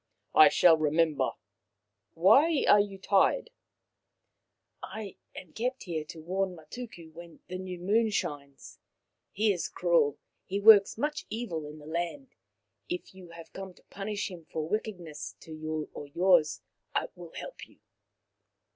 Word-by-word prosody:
" - - -51
I 390 - +9
shall 165 -2 +6
remember. 155 0 +1 0.8
Why 275 - +5
are 205 - +7
you 200 -1 -1
tied? 200 - +2 0.5
" - - -54
" - - -52
I 215 -3 -7 0.2
am 165 - -10
kept 250 +3 -2
here 165 -4 -3
to 160 - -10
warn 185 +2 -1
Matuku 170 0 -10
when 170 0 -12
the 185 0 -5
new 185 -1 -6
moon 215 +6 +2
shines. 145 -8 -5 0.5
He 210 0 +2
is 175 - -3
cruel; 170 -5 +2 0.3
he 195 +2 -3
works 205 -1 +7
much 300 +5 -2
evil 180 -10 -4
in 150 +1 -10
the 150 - -13
land. 175 - -4 0.6
If 355 - -5
you 185 -2 -13
have 170 -1 -12
come 190 -1 -8
to - - -23
punish 205 +1 -4
him 170 -3 -10
for 155 0 -4
wickedness 175 -7 -4
to 160 - -10
you 155 0 -4
or 145 - -8
yours, 170 0 +3 0.3
I - - 0
will - - -12
help - - -8
you." - - -23
180 Hz, 155 wpm, -29 LUFS, 160-210 Hz, 0.8 s, I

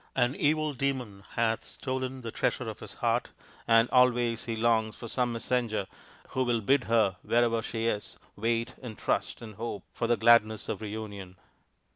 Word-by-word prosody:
An 125 +1 +2
evil 155 0 +1
demon 125 -7 -2
hath 115 -1 +1
stolen 130 -1 -4
the 115 -2 -5
treasure - - -1
of - - -6
his - - -9
heart, - - 0 0.4
and 115 +1 +6
always 120 -2 +3
he 115 - -2
longs 110 -1 +2
for 115 - -8
some 125 +1 0
messenger 115 -3 -1 0.4
who 130 - 0
will 120 -2 +1
bid 130 +5 +3
her, 110 -5 +2
wherever 115 -1 +2
she 115 0 -3
is, 105 -3 -2 0.2
wait 115 +2 0
and 115 -5 -7
trust - - -1
and 110 -3 -10
hope 115 -4 -4
for 115 - -1
the 120 0 +3
gladness 110 -2 +4
of - - -3
reunion." 100 -3 -6
115 Hz, 170 wpm, -29 LUFS, 110-125 Hz, 0.4 s, and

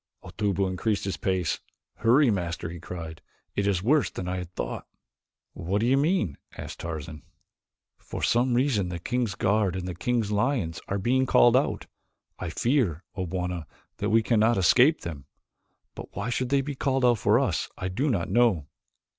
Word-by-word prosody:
Otobu 100 -2 -1
increased 100 +3 -1
his 95 - -2
pace. 90 -4 -1 0.4
"Hurry, 125 +3 +4
Master," 85 -4 -2
he 85 - -8
cried, 80 -2 -7 0.3
"it 100 0 0
is 95 -3 +1
worse 145 +5 +3
than 90 - -6
I 90 0 -2
had 90 -1 -7
thought." - - -4 0.7
"What 95 +5 -2
do 115 - +1
you 130 +2 +4
mean?" 140 - +1 0.2
asked - - -7
Tarzan. 80 -2 -6 0.8
"For - - -7
some 120 +1 +2
reason 120 -8 +1
the 90 - -4
king's 120 +2 -2
guard 100 -2 +1
and 90 -1 -4
the 90 - -3
king's 115 +3 -1
lions 105 - 0
are 100 - -1
being 130 +6 +1
called 120 -1 +5
out. 135 - +1 0.5
I 95 - -4
fear, 105 - 0
O 95 -3 -3
Bwana, 90 -2 -3 0.3
that - - -1
we 110 +2 +4
cannot 115 0 +3
escape 125 - +5
them. 80 -5 -7 0.7
But - - -10
why - - -3
they - - -2
should 130 +2 0
be 145 - -3
called 135 -1 0
out 120 -3 +4
for - - +4
us - - -1
I 90 - -3
do 130 +11 -1
not 100 -9 0
know." 115 -11 +3
100 Hz, 180 wpm, -27 LUFS, 90-125 Hz, 0.8 s, called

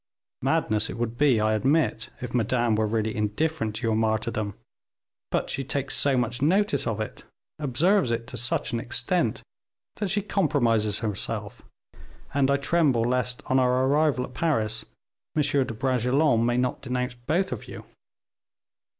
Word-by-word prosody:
"Madness 110 0 +1
it - - -6
would 115 0 -2
be, 135 -3 +3
I 110 0 +2
admit, 135 +1 +1
if 125 -1 -6
Madame 120 0 +1
were 110 0 +1
really 110 0 -1
indifferent 110 +3 -1
to 110 - -5
your 110 -1 +2
martyrdom; 110 -1 -1 0.7
but - - -1
she 135 - -2
takes 140 +1 -2
so 140 -2 +2
much 120 0 -1
notice 180 -1 +2
of 110 -1 -2
it, 110 - -5 0.4
observes 155 - +2
it 115 0 -1
to 130 - -8
such 120 0 0
an 115 - 0
extent, 120 +3 0 0.5
that 205 -3 -2
she 205 +2 +1
compromises 120 - +1
herself, 105 -3 -3 0.7
and 140 -1 +2
I 140 - +3
tremble 140 -5 +2
lest, 125 0 0
on 130 - +2
our 125 0 +2
arrival 145 -1 +2
at 125 - -14
Paris, 115 -9 0 0.5
M. 150 - +3
de 140 -1 +2
Bragelonne 125 +2 +2
may 120 0 +1
not 125 0 -1
denounce 125 -1 -2
both 155 +11 -1
of - - -5
you." - - -9
125 Hz, 160 wpm, -26 LUFS, 110-145 Hz, 0.7 s, be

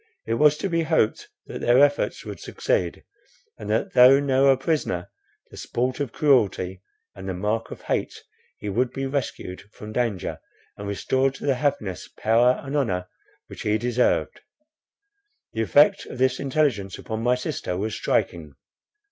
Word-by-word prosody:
It - - -1
was 150 +5 +4
to 195 - -2
be 165 -2 0
hoped 160 -9 +1 0.2
that - - -7
their 120 +1 +4
efforts 145 +1 +2
would - - -7
succeed, 85 -2 -2 0.6
and 105 - -7
that 110 +1 0
though 125 +2 +8
now 135 -1 +3
a 135 -1 +5
prisoner, 135 - -2 0.4
the - - -12
sport 125 +3 -2
of 140 -5 -2
cruelty 100 -11 +1 0.3
and 95 0 -8
the 95 - -3
mark 105 +5 -2
of - - -10
hate, - - -2 0.3
he - - -7
would 120 +5 0
be 135 - -3
rescued 130 -9 -4
from 110 0 -10
danger 115 -6 -2 0.4
and 100 - -7
restored 130 +6 0
to - - -8
the 140 - +3
happiness, 125 - -2
power, 120 +3 +3
and 140 +1 -5
honour 90 -10 -1 0.4
which - - -10
he 105 0 +1
deserved. 120 +2 0 1.1
The 110 - -1
effect 145 +7 +4
of - - -8
this 130 0 +1
intelligence 135 -9 0
upon 110 0 -5
my 125 +2 +3
sister 125 - -4
was 105 +3 -2
striking. 75 -7 -1
125 Hz, 165 wpm, -24 LUFS, 105-135 Hz, 1.1 s, though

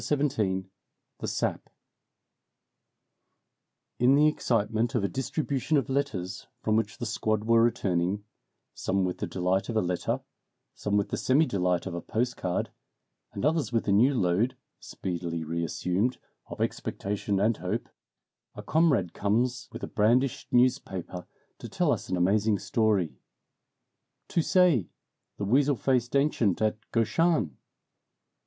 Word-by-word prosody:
XVII 145 -1 +1
In 95 -1 -1 0.5
the - - -4
Sap - - -2 2.3
IN 125 +3 +5
the 150 +2 +5
excitement 115 -5 0
of 115 - +1
a - - +2
distribution 140 +4 -1
of 135 - -1
letters 100 -10 -2 0.2
from 110 - +2
which 115 - -1
the 120 - -4
squad 110 -1 -1
were 115 +1 +4
returning 95 -4 +1 0.5
some 95 0 -1
with 90 - -3
the - - -2
delight 95 +3 0
of 115 - -1
a - - +4
letter, 90 0 -1 0.5
some 105 0 -1
with 100 - 0
the - - -2
semi 140 +5 +3
delight 90 - 0
of 95 - -4
a 85 - -4
postcard, 110 -6 -2 0.6
and 100 - -3
others 155 -3 +1
with 115 -2 0
a - - +3
new 125 +8 +4
load 100 +4 +1 0.2
(speedily 85 -2 -4
reassumed) 90 +8 -1 0.3
of - - -9
expectation 100 0 -2
and 110 +2 +2
hope 90 +7 -3 0.7
a - - -8
comrade 140 - +2
comes 120 +5 0
with - - -8
a - - -2
brandished 120 +5 +1
newspaper 110 -8 0 0.3
to - - -8
tell - - +1
us - - -2
an 90 - 0
amazing 100 +4 +2
story 100 -3 0 1.1
"Tu 170 - +1
sais, 165 - +3 0.5
the 100 - -3
weasel 140 +6 +3
faced 125 0 0
ancient 140 - +2
at 110 0 0
Gauchin?" 115 - +1
110 Hz, 140 wpm, -28 LUFS, 95-125 Hz, 2.3 s, IN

